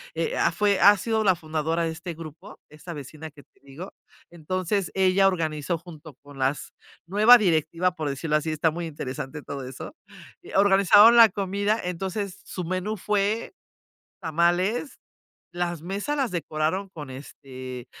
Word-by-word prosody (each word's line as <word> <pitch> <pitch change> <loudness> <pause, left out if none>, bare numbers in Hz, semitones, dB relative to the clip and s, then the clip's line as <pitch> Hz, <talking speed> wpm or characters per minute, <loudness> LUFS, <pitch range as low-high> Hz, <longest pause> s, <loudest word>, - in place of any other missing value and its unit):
eh, 475 +2 -2
ah, - - +3
fue 205 -1 +1
ha 205 +1 +7
sido 220 +2 -1
la 190 -3 +4
fundadora 160 0 -2
de 165 - -1
este 170 +1 -7
grupo, 165 +5 -11
esta 155 +3 -9
vecina 150 +2 -9
que 145 -1 -17
te - - -35
digo. 140 +7 -10 0.4
Entonces, 185 +3 -2
ella 190 0 +4
organizó 160 -3 -1
junto 160 -3 -13
con 145 -1 -13
las 135 +2 -1 0.4
nueva 215 +7 +7
directiva, 170 -2 +1
por 155 -4 -3
decirlo 150 +2 0
así, 155 +1 -3
está 155 +1 +1
muy 170 +1 -5
interesante 145 -1 -6
todo 140 -1 -6
eso. 130 - -9 0.6
Organizaron 200 +3 +6
la 230 -1 +8
comida, 200 +2 -1
entonces, 190 +2 -4
su 180 - -6
menú 185 +5 -3
fue 210 +3 -1 0.7
tamales. 175 - 0 0.6
Las 175 -2 -3
mesas 200 - -3
las 270 -5 0
decoraron 165 +3 -2
con, 150 -7 -9
este, 130 -2 -9
175 Hz, 150 wpm, -25 LUFS, 155-195 Hz, 0.7 s, la